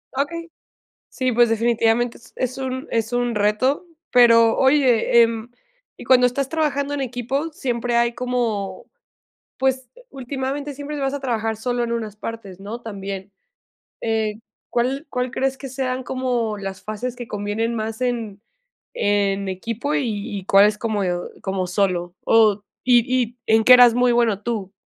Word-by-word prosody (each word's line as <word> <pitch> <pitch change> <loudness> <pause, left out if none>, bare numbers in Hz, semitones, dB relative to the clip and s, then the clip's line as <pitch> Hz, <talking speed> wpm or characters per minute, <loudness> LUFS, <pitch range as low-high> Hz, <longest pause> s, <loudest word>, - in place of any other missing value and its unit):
Okey. 330 +5 -3 0.6
Sí, 255 -2 -1
pues, 240 0 +4
definitivamente 230 +1 +1
es - - -19
es 255 0 -2
un 260 +1 -4
es 225 +1 -1
un 245 -2 0
reto, 215 - +1 0.3
pero 230 -2 +6
oye, 260 -4 +4
em, 230 0 -2 0.5
y - - -11
cuando 250 -1 +5
estás 270 +2 -2
trabajando 290 -3 -1
en 285 - -2
equipo, 265 +5 -2
siempre 240 -4 -2
hay 235 0 +2
como, 230 -6 -2 0.7
pues, 265 -1 0 0.2
últimamente 275 +2 -4
siempre 290 +2 -6
vas 270 0 -1
a 285 - -3
trabajar 225 -4 -2
solo 245 +2 -1
en 235 - -3
unas 220 -3 -3
partes, 210 -4 -8
¿no? 220 +4 -6
También. 200 -2 -7 0.7
Eh, 220 -2 0 0.3
¿cuál 265 +5 -1
cuál 250 0 -2
crees 270 0 -1
que 270 0 -8
sean 255 0 -3
como 245 -4 -1
las 195 -1 -6
fases 225 +4 -4
que 245 -1 -8
convienen 210 +3 -2
más 220 +1 -4
en 230 -5 -2 0.5
en 200 -1 0
equipo 230 +9 -3
y 210 -4 -2
y 190 - -10
cuáles 205 +2 +5
como 215 -3 -1 0.4
como 190 -2 -2
solo? 180 -2 0
O 215 -2 +4 0.2
y 245 -1 +6 0.2
y 240 +2 -9
¿en 220 0 +4
qué 250 - +8
eras 245 -2 +8
muy 245 0 +3
bueno 230 -4 +2
tú? 210 -5 -3
235 Hz, 155 wpm, -22 LUFS, 215-255 Hz, 0.7 s, qué